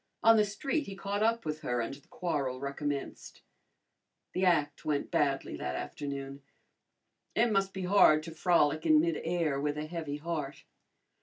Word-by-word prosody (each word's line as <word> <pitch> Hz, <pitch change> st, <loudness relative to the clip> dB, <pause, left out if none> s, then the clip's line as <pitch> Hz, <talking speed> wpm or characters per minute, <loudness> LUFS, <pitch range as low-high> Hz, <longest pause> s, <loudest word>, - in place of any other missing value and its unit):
On 225 Hz, 0 st, +8 dB
the 215 Hz, -1 st, +4 dB
street 270 Hz, +9 st, -2 dB
he 195 Hz, -, -6 dB
caught 200 Hz, +1 st, -3 dB
up 230 Hz, -1 st, +1 dB
with 155 Hz, 0 st, -3 dB
her 125 Hz, -5 st, -1 dB
and 115 Hz, +3 st, -2 dB
the 140 Hz, -, -14 dB
quarrel 140 Hz, -8 st, -2 dB
recommenced. 140 Hz, +1 st, -5 dB, 0.9 s
The 185 Hz, -, -1 dB
act 150 Hz, -5 st, +1 dB
went 145 Hz, -2 st, -1 dB
badly 140 Hz, -2 st, 0 dB
that 65 Hz, 0 st, -3 dB
afternoon. 140 Hz, -, -5 dB, 0.9 s
It 235 Hz, 0 st, +3 dB
must 195 Hz, -1 st, +1 dB
be 190 Hz, -1 st, -5 dB
hard 180 Hz, -5 st, +5 dB
to 165 Hz, -, -7 dB
frolic 160 Hz, -2 st, +2 dB
in 155 Hz, -1 st, +7 dB
midair 165 Hz, -2 st, 0 dB
with 145 Hz, 0 st, -1 dB
a 150 Hz, -, -3 dB
heavy 155 Hz, -3 st, -4 dB
heart. 150 Hz, -3 st, -4 dB
155 Hz, 160 wpm, -31 LUFS, 140-185 Hz, 0.9 s, On